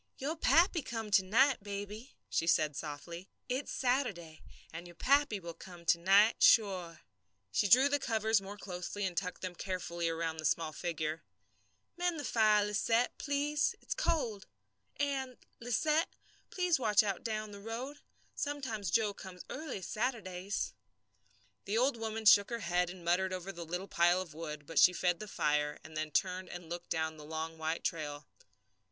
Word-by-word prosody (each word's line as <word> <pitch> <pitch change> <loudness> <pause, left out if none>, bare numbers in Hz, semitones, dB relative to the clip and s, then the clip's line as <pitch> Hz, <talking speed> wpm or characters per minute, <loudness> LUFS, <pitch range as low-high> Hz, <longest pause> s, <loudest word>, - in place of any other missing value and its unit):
"Your 290 +5 -2
pappy 330 +4 +4
will 290 - -7
come 225 -2 -4
to 195 -1 +5
night, 250 +6 +3
baby," 205 +4 -7
she 165 - 0
said, 155 -3 +3
softly. 165 +5 -7 0.2
"It's 260 +3 -2
Saturday, 220 - -1 0.3
and 170 +2 -7
your 175 - -13
pappy 280 - +3
will 170 -2 -7
come 175 0 -12
to 170 - +4
night, 200 +5 +5
sure." 185 -7 +4 0.5
She 205 - +2
drew 255 +7 +7
the 290 0 +1
covers 220 -3 +1
more 200 +1 -8
closely, 190 +1 -4
and 185 -2 -3
tucked 180 0 -3
them 185 -1 -3
carefully 175 -1 -3
about 165 -1 -2
the 155 - -4
small 160 0 +1
figure. 155 -1 -3 0.8
"Mend 355 -2 0
the - - -4
fire, 215 -4 +4
Lisette, 225 +4 +1
please. 290 +1 0
It's - - -4
cold. 270 - -1 0.5
And, 270 -3 -2 0.2
Lisette, 305 +7 +1 0.4
please 360 -5 +1
watch 215 -4 +4
out 200 -3 -2
down 215 -2 -3
the 200 - -9
road. 245 +7 -5 0.3
Sometimes 260 - -3
Joe 210 +3 +2
comes 185 -2 -10
early 290 -9 -5
Saturdays." 205 -4 -2 0.9
The 210 +3 -1
old 255 +2 +3
woman 225 -1 -4
shook 200 -1 +7
her 235 -1 -3
head 175 -1 +1
and 180 -1 -10
muttered 185 +2 +2
over 185 +1 -4
the 170 -2 -8
little 180 +4 -4
pile 175 0 +3
of 180 -4 -6
wood, 150 -2 -6
but 165 +2 0
she 180 - +7
fed 175 -1 +1
the 215 - -7
fire, 150 -5 0
and 155 0 -12
then 155 0 -2
turned 185 +3 -1
and 175 -2 -9
looked 175 0 -6
down 160 -1 -1
the 150 - -10
long 160 +1 -5
white 160 +1 -2
trail. 145 -3 -3
195 Hz, 170 wpm, -33 LUFS, 170-235 Hz, 0.9 s, drew